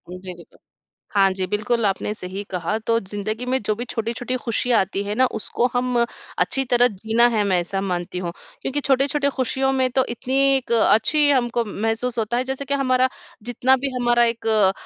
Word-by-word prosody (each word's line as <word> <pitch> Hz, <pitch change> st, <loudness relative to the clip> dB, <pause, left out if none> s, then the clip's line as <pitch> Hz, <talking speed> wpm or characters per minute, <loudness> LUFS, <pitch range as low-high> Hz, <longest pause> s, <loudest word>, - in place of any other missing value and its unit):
बिल्कुल। 185 Hz, -2 st, -11 dB, 0.5 s
हाँ 195 Hz, -1 st, +4 dB
जी, 190 Hz, 0 st, -2 dB
बिल्कुल 215 Hz, +2 st, 0 dB
आपने 200 Hz, +1 st, -1 dB
सही 190 Hz, -1 st, -6 dB
कहा 180 Hz, +3 st, -2 dB
तो 230 Hz, 0 st, +3 dB
ज़िंदगी 215 Hz, +3 st, -4 dB
में 260 Hz, +1 st, 0 dB
जो 215 Hz, -, 0 dB
भी 240 Hz, +3 st, -5 dB
छोटी-छोटी 235 Hz, +2 st, -3 dB
खुशियाँ 235 Hz, 0 st, +1 dB
आती 195 Hz, +1 st, -1 dB
है 205 Hz, +1 st, -3 dB
ना, 260 Hz, +3 st, +4 dB
उसको 230 Hz, 0 st, -2 dB
हम 250 Hz, 0 st, 0 dB, 0.4 s
अच्छी 270 Hz, -, +1 dB
तरह 245 Hz, 0 st, +4 dB
जीना 225 Hz, +2 st, +1 dB
है 215 Hz, -2 st, +2 dB
मैं 190 Hz, -3 st, +2 dB
ऐसा 195 Hz, +3 st, -3 dB
मानती 180 Hz, -2 st, -3 dB
हूँ, 180 Hz, -1 st, -3 dB, 0.3 s
क्योंकि 290 Hz, -, 0 dB
छोटे-छोटे 280 Hz, +1 st, +2 dB
खुशियों 265 Hz, 0 st, 0 dB
में 260 Hz, -1 st, +2 dB
तो 260 Hz, -1 st, +3 dB
इतनी 245 Hz, +2 st, -4 dB, 0.2 s
एक 265 Hz, -3 st, -2 dB
अच्छी 235 Hz, +7 st, +4 dB
हम 260 Hz, -4 st, +3 dB
को 235 Hz, -, +3 dB
महसूस 225 Hz, +4 st, -2 dB
होता 225 Hz, +2 st, -1 dB
है 250 Hz, -, +1 dB
जैसे 265 Hz, +2 st, -4 dB
कि 280 Hz, -, -2 dB
हमारा 260 Hz, -2 st, +2 dB, 0.3 s
जितना 245 Hz, +3 st, +2 dB
भी 270 Hz, +1 st, -2 dB
हमारा 240 Hz, -1 st, +3 dB
एक 230 Hz, -1 st, -2 dB
अ, 210 Hz, -4 st, +4 dB
235 Hz, 195 wpm, -22 LUFS, 205-255 Hz, 0.5 s, हाँ